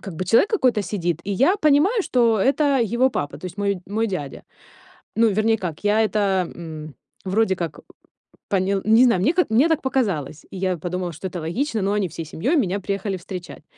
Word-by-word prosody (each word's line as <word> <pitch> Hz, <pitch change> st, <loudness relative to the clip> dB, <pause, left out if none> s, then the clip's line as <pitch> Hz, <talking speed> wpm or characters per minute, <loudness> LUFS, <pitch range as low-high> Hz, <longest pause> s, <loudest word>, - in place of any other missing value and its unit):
как 195 Hz, -4 st, -8 dB
бы 185 Hz, -, -3 dB
человек 230 Hz, -, +3 dB
какой-то 255 Hz, -, +2 dB
сидит, 175 Hz, -4 st, -2 dB
и 205 Hz, -, -4 dB
я 275 Hz, -, +3 dB
понимаю, 330 Hz, -, +3 dB
что 235 Hz, -8 st, +2 dB
это 270 Hz, -1 st, +2 dB
его 260 Hz, +2 st, +3 dB
папа, 145 Hz, -, -4 dB
то 185 Hz, -, -7 dB
есть 180 Hz, +2 st, -10 dB
мой 200 Hz, -1 st, 0 dB
мой 220 Hz, +3 st, -1 dB
дядя. 150 Hz, -9 st, -5 dB, 0.7 s
Ну, 225 Hz, +1 st, +4 dB
вернее 215 Hz, +2 st, +2 dB
как, 180 Hz, -2 st, -6 dB
я 215 Hz, +2 st, +3 dB
это, 215 Hz, -, -2 dB, 0.4 s
м, 155 Hz, -2 st, -8 dB, 0.3 s
вроде 190 Hz, +1 st, +1 dB
как 165 Hz, -4 st, -5 dB, 0.7 s
поня 195 Hz, 0 st, +1 dB
не 225 Hz, +3 st, +6 dB
знаю, 230 Hz, -8 st, +3 dB
мне 285 Hz, -, +2 dB
как, 360 Hz, -6 st, +1 dB
мне 255 Hz, +9 st, +4 dB
так 320 Hz, -2 st, +1 dB
показалось, 185 Hz, -, -2 dB
и -, -, -7 dB
я 185 Hz, -1 st, -1 dB
подумала, 180 Hz, +2 st, -4 dB
что 160 Hz, +5 st, -6 dB
это 180 Hz, -1 st, -6 dB
логично, 220 Hz, -, -2 dB
ну, 195 Hz, -, 0 dB
они 205 Hz, -2 st, 0 dB
всей 165 Hz, 0 st, -7 dB
семьёй 245 Hz, -, -1 dB
меня 200 Hz, -7 st, 0 dB
приехали 195 Hz, 0 st, -3 dB
встречать. 180 Hz, 0 st, -9 dB
200 Hz, 200 wpm, -22 LUFS, 180-235 Hz, 0.7 s, не